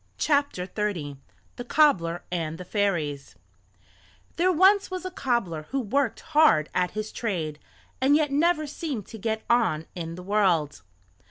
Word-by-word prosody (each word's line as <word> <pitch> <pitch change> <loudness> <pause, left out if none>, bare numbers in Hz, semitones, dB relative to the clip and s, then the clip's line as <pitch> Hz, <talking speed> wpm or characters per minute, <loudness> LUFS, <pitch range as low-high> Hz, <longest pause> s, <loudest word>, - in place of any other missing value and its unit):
THE 205 - -1 0.5
COBBLER 175 - +3
AND 165 -2 -3
THE 180 - -8
FAIRIES 170 -9 -2 1.0
There 360 +2 +3
was 385 +4 +4
once 370 0 -5
a 370 - -4
cobbler 215 - -2
who 270 - -1
worked 255 +1 -1
hard 295 - +3
at 180 -1 +1
his 215 0 -3
trade, 165 -9 -3 0.4
and 275 +2 +4
yet 300 -2 +2
never 310 +2 +2
seemed 285 - -5
to 225 - -9
get 220 +1 -2
on 225 -10 +2
in 165 -2 -6
the 180 - -9
world. 180 - +1
210 Hz, 140 wpm, -26 LUFS, -, 1.0 s, was